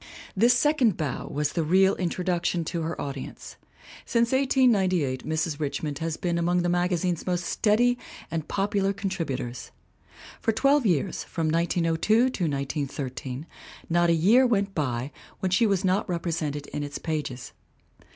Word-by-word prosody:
This 235 +5 +5
second 260 - +3
bow 145 -6 -3
was 150 0 -2
the 165 - 0
real 190 +5 +4
introduction 175 -1 -1
to 170 +1 -3
her 165 +1 -3
audience. 140 -2 -6 0.5
Since 235 -1 +1
1898 200 - +2
Mrs. 160 -1 -1
Richmond 145 -1 -3
has 165 -1 -2
been 170 -1 -1
among 175 +1 +1
the 175 - +1
magazine's 175 0 0
most 180 -1 0
steady 240 +6 +2 0.3
and 160 -2 -3
popular 200 0 0
contributors. 165 - -4 0.7
For 225 - +1
twelve 275 +2 +3
years, 175 0 0
from 160 -2 -2
1902 165 +4 +1
to 235 - +5 0.2
1913, 140 -2 -3 0.5
not 175 0 +3
a - - +5
year 215 +11 +5
went 200 -4 0
by 130 -4 -2 0.3
when 185 - -1
she 205 +5 +4
was 195 -1 +1
not 190 +2 +1
represented 160 -4 -2
in 150 - -5
its 145 0 -5
pages. 145 -6 -4
175 Hz, 145 wpm, -26 LUFS, 150-195 Hz, 0.7 s, This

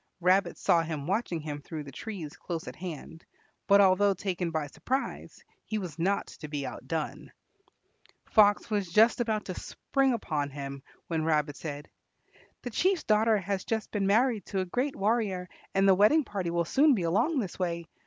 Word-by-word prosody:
Rabbit 185 +3 +2
saw 170 - +3
him 160 -3 -4
watching 185 -2 -1
him 150 -1 -5
through 155 0 -6
the 140 - -10
trees 170 - -7
close 170 -2 -5
at 125 - -7
hand, 165 -1 -8 0.4
but 200 0 +6
although 195 +1 +4
taken 180 -2 -2
by 160 -2 -2
surprise, 260 - -4 0.2
he 215 - -3
was 175 -7 -6
not 195 +4 +1
to 150 - -10
be 145 -2 -4
outdone. - - -5 0.9
Fox 205 0 +4
was 200 -5 -1
just 225 +5 +5
about 220 -3 -1
to 185 - -4
spring 270 -2 0
upon 150 -10 -2
him 140 -1 -7 0.2
when 160 -2 -1
Rabbit 150 -2 +1
said, 145 -2 -6 0.8
"The 245 - -5
Chief's 370 - +1
daughter 215 +1 +3
has 195 -1 -2
just 220 -1 -3
been 200 -2 0
married 225 +1 +2
to 195 -2 -1
a - - -2
great 250 +9 -1
warrior, 200 -4 0 0.3
and 195 0 +4
the 195 - +7
wedding 210 +12 +5
party 195 -7 -3
will 170 0 0
soon 280 - +4
be 185 - -2
along 230 - +1
this 200 -8 -3
way. 170 -2 -2
190 Hz, 180 wpm, -29 LUFS, 165-215 Hz, 0.9 s, the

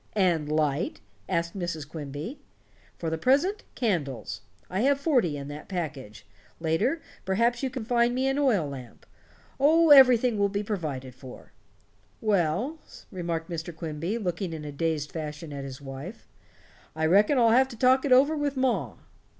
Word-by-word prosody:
"And 170 -7 +1
light?" 155 +1 0 0.3
asked 170 -1 -1
Mrs. 170 -6 -4
Quimby. 150 - -7 0.6
"For 165 -2 -3
the 160 - -2
present, 305 - +2
candles. 165 - -2 0.3
I 185 - -3
have 275 +2 +3
forty 245 - +1
in 140 -1 -6
that 145 +1 -9
package. 150 - -5 0.3
Later, 165 - 0 0.2
perhaps 235 +6 +1
you 265 - -1
can 255 -3 -6
find 240 +1 +2
me 260 +1 +1
an 270 +1 0
oil 220 - +2
lamp. 130 -4 -10 0.5
Oh, 320 +3 +5
everything 250 -5 +7
will 200 0 +3
be 200 +1 -2
provided 150 - -4
for." 130 0 -12 0.7
"Well," 210 - 0 0.3
remarked 170 -3 -3
Mr. 165 0 -5
Quimby, 165 +6 -3
looking 180 -4 -3
in 155 -2 -6
a 145 - -5
dazed 150 0 -2
fashion 155 -1 -6
at 140 -1 -5
his 135 -1 -7
wife, 140 - -9 0.7
"I 160 0 0
reckon 205 - +4
I'll 230 -2 +5
have 260 +3 +5
to 240 -3 -11
talk 260 +2 +4
it 280 - -1
over 275 +5 +5
with 290 -2 -2
ma." 260 -1 0
180 Hz, 160 wpm, -27 LUFS, 155-250 Hz, 0.7 s, everything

